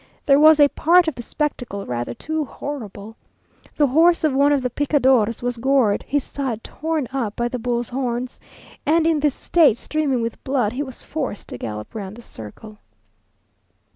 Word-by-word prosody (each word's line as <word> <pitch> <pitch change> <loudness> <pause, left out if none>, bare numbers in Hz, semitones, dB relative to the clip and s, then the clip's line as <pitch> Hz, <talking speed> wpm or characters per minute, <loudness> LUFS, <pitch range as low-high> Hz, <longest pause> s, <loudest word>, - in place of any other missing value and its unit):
There 280 0 +5
was 310 0 +7
a 290 - +8
part 340 +4 +3
of 320 - 0
the 245 - -7
spectacle 245 -7 -3
rather 120 -1 -4
too 315 0 -3
horrible. 225 -7 -7 0.6
The 295 - +3
horse 325 +6 +4
of 305 -3 +2
one 280 +2 +4
of 280 -3 +1
the 250 - -1
picadors 260 -6 +2
was 245 0 -2
gored, 255 -4 +2
his 285 -1 0
side 255 -6 -4
torn 315 -3 -3
up 230 -6 -2
by 240 - -1
the 250 - -4
bull's 240 0 -2
horns, 245 -1 -3 0.4
and 320 +2 +2
in 325 -2 +2
this 290 -2 +1
state, 310 -10 +3
streaming 275 -4 -1
with 230 0 -5
blood, 250 -5 0
he 265 - -3
was 260 -4 -7
forced 280 -9 -5
to - - -6
gallop 105 -1 -6
round 200 -2 -6
the 240 - -12
circle. 210 - -11
260 Hz, 180 wpm, -21 LUFS, 230-295 Hz, 0.6 s, a